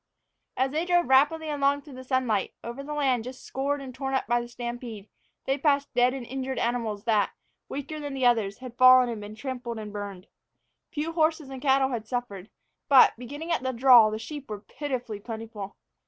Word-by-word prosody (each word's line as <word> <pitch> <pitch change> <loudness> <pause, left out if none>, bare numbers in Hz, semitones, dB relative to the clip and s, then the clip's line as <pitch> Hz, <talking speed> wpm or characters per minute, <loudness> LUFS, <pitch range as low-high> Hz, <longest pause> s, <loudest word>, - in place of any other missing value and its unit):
As 260 +1 +1
they 310 +3 0
drove 350 -2 +2
rapidly 295 +4 +4
along 285 -1 +1
through 290 - -12
the 260 0 -9
sunlight, 255 -6 0
over 235 +4 -6
the 295 +2 -6
land 265 -5 +1
just 255 +2 -9
scored 280 +2 -2
and 260 -1 -8
torn 270 +1 -3
up 265 - 0
by 240 +1 +1
the 240 - -7
stampede, 240 -3 -7 0.4
they 270 +1 0
passed 285 -1 +1
dead 245 +1 +4
and 260 -3 -6
injured 265 +1 -4
animals 230 -4 -1
that, 215 -3 +1 0.4
weaker 285 +2 -5
than 290 -2 -5
the 260 -2 0
others, 220 -5 +2
had 255 -2 -10
fallen 255 -1 +8
and 225 -3 -5
been 205 +1 -8
trampled 245 -1 -5
and 210 -1 -7
burned. 200 -3 -6 0.7
Few 310 +2 -3
horses 315 -3 +1
and 265 -1 -7
cattle 270 -1 +3
had 230 -4 -4
suffered, 220 -5 -4 0.4
but, 275 -2 +8
beginning 290 +8 -7
at 330 - +1
the 260 0 -2
draw, 240 -3 +7
the 215 - -3
sheep 280 +4 -8
were 210 -1 -5
pitifully 245 -5 -5
plentiful. 220 -2 -7
255 Hz, 200 wpm, -27 LUFS, 230-280 Hz, 0.7 s, fallen